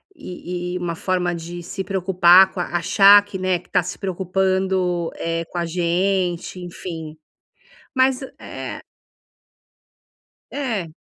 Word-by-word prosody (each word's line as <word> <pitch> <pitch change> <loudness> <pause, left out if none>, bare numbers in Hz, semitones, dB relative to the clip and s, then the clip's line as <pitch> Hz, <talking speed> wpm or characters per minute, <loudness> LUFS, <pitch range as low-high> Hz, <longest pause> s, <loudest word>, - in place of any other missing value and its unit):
e 180 - -6
e - - -1
uma 175 -2 -3
forma 180 0 -1
de 170 +1 -7
se 190 +3 -5
preocupar 185 -1 +5
com 185 - -7
a 175 - 0
achar 200 +4 +6
que, 205 -2 -6
né, 185 -1 +1
que - - -22
está - - +2
se 180 +2 -6
preocupando, 190 -2 0
eh, 165 0 -3
com 175 - -9
a 170 - 0
gente, 180 +1 -1
enfim, 165 -3 -7 0.8
mas 260 0 +2 0.2
é - - -7 1.7
É. 220 - -3
180 Hz, 130 wpm, -21 LUFS, 175-190 Hz, 1.7 s, achar